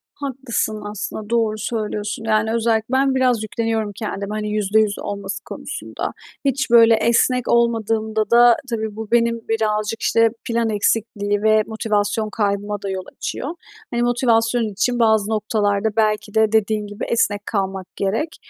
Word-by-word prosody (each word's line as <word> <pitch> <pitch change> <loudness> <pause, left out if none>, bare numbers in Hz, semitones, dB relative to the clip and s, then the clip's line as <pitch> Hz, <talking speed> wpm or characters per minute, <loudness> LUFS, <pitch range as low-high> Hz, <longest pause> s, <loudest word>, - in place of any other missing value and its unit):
Haklısın 260 -6 -3
aslında, 210 0 -6
doğru 225 -2 +1
söylüyorsun; 215 0 -3
yani, 220 0 +1
özellikle 225 -1 +1
ben 270 0 +3
biraz 250 -4 +2
yükleniyorum 220 -1 -2
kendime, 205 -1 -4
hani, 210 0 -3
%100 210 0 +1
olması 200 -1 -5
konusunda. - - -5 0.3
Hiç 270 -1 0
böyle 230 -1 +7
esnek 235 +2 +2
olmadığımda 220 -2 +1
da, 240 0 +7
tabii, 220 -3 -3
bu 220 0 -7
benim 235 -1 +2
birazcık, 215 0 0
işte, 230 0 +3 0.2
plan 230 -2 0
eksikliği 205 -1 0
ve 215 0 +4
motivasyon 215 -1 -1
kaybıma 205 -1 -2
da 200 - -4
yol 190 -1 -3
açıyor. 275 - -4 0.4
Hani, 240 -1 -1
motivasyon 235 -1 +2
için 240 +5 0
bazı 220 -2 +3
noktalarda 210 -1 0
belki 215 -1 +1
de, 220 -1 +3
dediğin 215 -1 +1
gibi, 205 0 -7
esnek 205 -3 +1
kalmak 190 -2 -2
gerek 225 +12 -2
220 Hz, 145 wpm, -20 LUFS, 210-230 Hz, 0.4 s, böyle